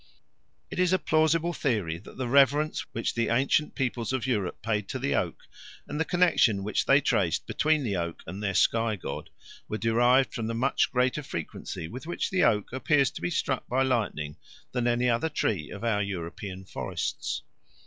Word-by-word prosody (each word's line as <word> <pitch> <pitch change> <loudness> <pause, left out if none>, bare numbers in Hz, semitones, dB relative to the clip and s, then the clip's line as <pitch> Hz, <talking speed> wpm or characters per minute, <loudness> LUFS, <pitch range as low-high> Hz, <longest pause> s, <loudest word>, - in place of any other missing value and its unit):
It - - -4
is 180 0 +3
a - - +5
plausible 160 +1 +2
theory 105 - -1
that 100 - -14
the 130 -2 -2
reverence 140 +4 +3
which 115 - -2
the 115 -1 0
ancient 135 +5 +2
peoples 125 -3 -1
of 130 -3 -1
Europe 105 -7 -1
paid 105 -2 -1
to - - -2
the - - -1
oak, - - -1 0.5
and 150 - -4
the 160 - +2
connexion 160 - +3
which 105 +1 0
they - - +6
traced - - +1
between 155 -1 +1
the 110 -5 -1
tree 85 -2 -1
and 95 +3 -7
their 100 -2 -1
sky 115 +2 +3
god, 95 - -6 0.4
were 110 - -3
derived 120 +2 +3
from 115 -2 -3
the 115 - -2
much 130 +4 +1
greater 125 +3 +1
frequency 85 - -6
with 130 - -8
which 175 - -2
the 185 -1 +2
oak 105 +1 +2
appears 140 +1 +2
to - - -8
be - - -1
struck 135 -6 -1
by 130 +2 +2
lightning 105 - -1 0.3
than 125 -1 0
any 120 +1 +2
other 120 +7 +1
tree 95 - -1
of 100 - -8
our 110 -3 +1
European 95 0 -5
forests. - - -3
120 Hz, 190 wpm, -28 LUFS, 105-140 Hz, 0.5 s, they